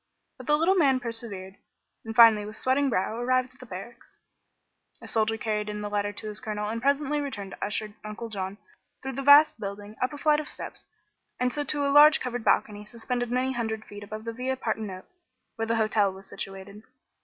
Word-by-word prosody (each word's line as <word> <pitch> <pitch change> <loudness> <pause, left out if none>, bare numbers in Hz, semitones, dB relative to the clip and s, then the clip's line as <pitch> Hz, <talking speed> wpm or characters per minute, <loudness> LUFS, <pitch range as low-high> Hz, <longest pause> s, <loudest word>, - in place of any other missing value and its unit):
But - - -10
the 295 0 +4
little 335 +5 +3
man 280 -8 +3
persevered, 225 -5 -6 0.5
and 225 0 -6
finally 225 -3 +8
with 210 +1 -7
sweating 270 +3 +2
brow 220 +1 -1
arrived 255 +1 +1
at 265 - -24
the 255 - -11
barracks. 220 +5 -10 0.8
A - - -11
soldier 225 0 +1
carried 210 -1 -2
in 210 0 -4
the 205 0 -5
letter 205 0 0
to 205 +1 -8
his 210 0 -5
colonel 210 -1 -3
and 230 +1 -3
presently 285 +2 +1
returned 210 -9 -5
to - - -7
usher 210 0 -2
Uncle 215 +2 -6
John 195 -2 -5 0.5
through 265 - -3
the 275 - -4
vast 285 +3 +7
building, 205 +1 -7
up 255 - +1
a 295 - -7
flight 300 0 +3
of 305 - -5
steps, - - -7 0.5
and 250 0 +1
so 295 - -1
to 285 0 +1
a 280 - +1
large 300 +2 +8
covered 245 -2 -4
balcony 210 -1 +1
suspended 240 +3 -4
many 255 +2 0
hundred 220 -3 -3
feet 205 0 -10
above 215 +1 -7
the 230 0 -5
Via 260 +2 -2
Partenope, 215 -6 -4 0.5
where 225 -1 -3
the 230 - +1
hotel 215 -3 +2
was 190 +1 -12
situated. 195 +1 -8
225 Hz, 205 wpm, -27 LUFS, 210-260 Hz, 0.8 s, finally